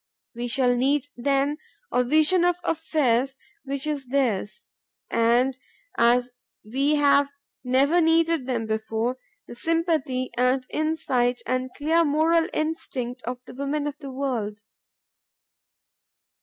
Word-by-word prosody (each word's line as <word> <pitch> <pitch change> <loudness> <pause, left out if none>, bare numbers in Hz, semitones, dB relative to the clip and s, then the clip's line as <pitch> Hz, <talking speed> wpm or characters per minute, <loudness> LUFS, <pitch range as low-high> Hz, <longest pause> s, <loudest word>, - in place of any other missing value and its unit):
We 240 0 -4
shall 245 0 +2
need 275 +3 +1
then 280 +4 0 0.3
a 250 +1 +2
vision 310 +7 +3
of 355 0 +3
affairs 270 -6 0 0.3
which 275 0 -4
is 290 -4 -3
theirs, 255 - -1 0.5
and, 245 +3 +2 0.4
as 245 +1 +3 0.3
we 275 +7 +1
have 285 -1 +4 0.3
never 275 +7 +3
needed 325 -3 +2
them 235 -3 -1
before, 220 +3 -2 0.3
the - - -9
sympathy 310 -3 0
and 255 +1 +2
insight 275 -6 0
and 255 0 -1
clear 320 +3 +2
moral 320 +2 +2
instinct 255 -6 -3
of 250 +1 -4
the - - -11
women 280 +2 -2
of 295 -1 -3
the 280 - -8
world. 240 -7 -3
270 Hz, 120 wpm, -25 LUFS, 245-305 Hz, 0.5 s, have